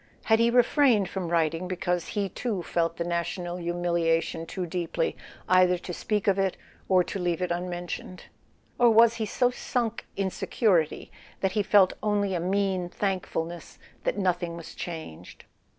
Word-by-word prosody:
Had 220 -1 +3
he 230 0 +4
refrained 240 -4 +4
from 190 -3 -3
writing 165 +1 0
because 180 -2 -1
he 200 -1 -1
too 195 -1 -3
felt 165 0 -1
the 170 - -1
national 175 +1 -3
humiliation 170 -1 0
too 185 +1 -4
deeply 175 - -2 0.3
either 185 -1 +5
to 175 0 -7
speak 210 +3 -1
of 195 -1 +3
it 195 -1 0 0.3
or 185 -1 +5
to 195 - -5
leave 175 -1 0
it 180 -1 -2
unmentioned? 175 +1 -4 0.6
Or 240 -1 +6
was 230 +1 +6
he 220 -2 -2
so 245 +5 +2
sunk 235 -2 -2
in 195 -1 -1
security 180 -10 0 0.3
that 190 - +1
he 210 - +1
felt 200 -2 +5
only 205 -2 +1
a 175 - 0
mean 190 0 0
thankfulness 175 -4 -3 0.3
that - - -1
nothing 175 -3 0
was 170 - -9
changed? 125 - -8
185 Hz, 160 wpm, -27 LUFS, 175-205 Hz, 0.6 s, Or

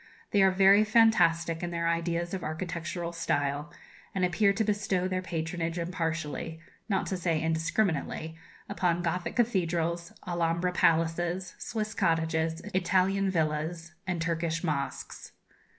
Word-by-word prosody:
They 205 - +4
are 190 - +7
very 195 +2 +6
fantastic 170 -7 +3
in 175 - -2
their 170 -1 -1
ideas 170 +1 -1
of 185 -2 -3
architectural 170 +1 -4
style, 145 -1 -1 0.4
and 185 -1 +2
appear 200 +3 +3
to 210 +3 0
bestow 200 -3 0
their 185 0 -1
patronage 165 -1 -3
impartially, 165 -2 -3 0.3
not 195 -2 +1
to 190 - -2
say 170 -3 0
indiscriminately, 160 0 -1 0.3
upon 175 -3 0
Gothic 175 +1 -2
cathedrals, 170 -7 0 0.2
Alhambra 170 0 0
palaces, 170 +2 +1
Swiss 215 -1 -3
cottages, 160 -2 0
Italian 190 +2 +2
villas, 165 0 -1
and 175 -2 -1
Turkish 165 0 -1
mosques. 145 -5 -3
170 Hz, 125 wpm, -29 LUFS, 165-185 Hz, 0.4 s, are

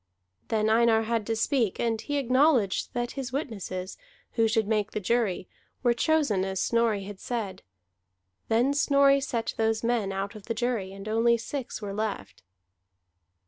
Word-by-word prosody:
Then 215 -1 +1
Einar 225 0 +4
had 225 -1 -1
to 225 - 0
speak; 225 -2 0
and 225 -2 0
he 290 -1 -2
acknowledged 255 -5 +2
that 240 0 -1
his 265 -3 -5
witnesses, 200 -9 -4 0.3
who 225 -1 +2
should 220 -1 +1
make 210 -2 0
the - - -1
jury, 210 -3 0 0.4
were 240 -1 +4
chosen 260 - +2
as 190 -1 -2
Snorri 230 -3 +1
had 200 0 -9
said. 225 -6 -4 0.9
Then 240 +5 +2
Snorri 280 -1 +4
set 235 -4 -2
those 225 0 +1
men 230 -4 0
out 195 +2 -3
of 215 -3 -11
the 230 - -3
jury, 230 -5 -1
and 195 +1 -9
only 230 +2 +3
six 240 -1 -5
were 200 -1 -4
left. 205 - -4
225 Hz, 160 wpm, -27 LUFS, 205-245 Hz, 0.9 s, Einar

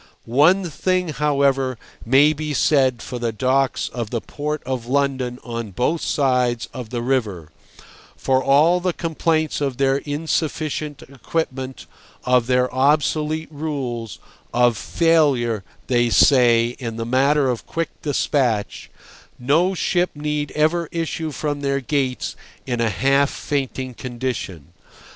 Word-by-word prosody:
One 165 +10 +3
thing, 180 +2 -1
however, 140 -4 +1 0.3
may 140 +6 +5
be 150 -1 -4
said 130 -5 +2
for 125 - -6
the 120 -1 -1
docks 130 +4 +1
of 120 -3 -5
the 115 - -2
Port 150 +5 -4
of 125 -3 -4
London 130 -2 0
on 115 -2 -5
both 125 - -1
sides 125 -4 +1
of 125 -4 -7
the 120 0 -3
river: 105 - -1 0.7
for 130 0 +1
all 155 +6 +4
the 180 0 -1
complaints 160 -2 -1
of 135 -3 -1
their 135 0 +2
insufficient 150 0 -3
equipment, 135 -1 -4 0.4
of 125 -2 +2
their 125 0 +1
obsolete 150 +3 +1
rules, 135 -8 -4 0.4
of 120 -1 +4
failure 135 - +2 0.2
(they 120 -1 +2
say) 120 -2 +5
in 115 -3 -5
the 115 0 -4
matter 135 +4 +2
of 125 -3 -3
quick 165 0 -2
despatch, 130 -7 -1 0.5
no 165 +9 +2
ship 180 0 +1
need 150 -1 -2
ever 160 +2 +1
issue 165 -1 -3
from 145 -1 -3
their 140 -1 0
gates 135 -1 -2 0.3
in 120 -2 -2
a 115 - +2
half 135 +8 +2
fainting 130 -2 -3
condition. 120 - -5
135 Hz, 130 wpm, -21 LUFS, 125-150 Hz, 0.7 s, may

